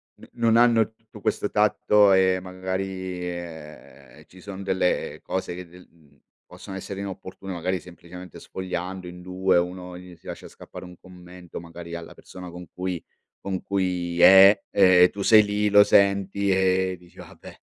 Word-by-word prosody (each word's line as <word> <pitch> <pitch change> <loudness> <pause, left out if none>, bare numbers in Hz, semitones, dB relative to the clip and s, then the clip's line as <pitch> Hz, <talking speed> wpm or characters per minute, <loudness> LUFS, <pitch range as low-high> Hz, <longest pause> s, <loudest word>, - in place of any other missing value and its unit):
no - - -16
non 115 -1 +1
hanno 115 -2 +4
tutto 110 -2 -17
questo 105 - -2
tatto 105 -1 +3
e 95 -1 +3
magari, 95 0 -5
ehm, 80 -3 -11
ci 95 - -18
sono 100 -1 -8
delle 95 -2 -1
cose 95 -2 -4
c 90 0 -9
del 90 +2 -17
mhmm, 75 -4 -27 0.3
possono 95 - -10
essere 95 +1 -7
inopportune. 95 0 -8
Magari 90 +2 -2
semplicemente 90 0 -12
sfogliando 95 0 -6
in 90 0 -10
2, 90 0 0
uno 90 +1 -3
gli 90 -1 -13
si 80 - -30
lascia - - -8
scappare - - -12
un 90 -1 -13
commento 90 -1 -12
magari 85 0 -10
alla 85 -1 -8
persona 90 -1 -11
con 90 +1 -10
cui 90 -2 -4 0.4
con 95 -2 -4
cui 90 -3 -2
è, 95 +2 +8
ehm, 90 -2 +6
tu 100 - -7
sei 110 +1 +6
lì 105 0 -1
lo 105 0 +7
senti 100 0 +2
e 95 -1 +1
dici: 90 0 -22
"Vabbè, - - -13
95 Hz, 165 wpm, -24 LUFS, 90-95 Hz, 0.4 s, è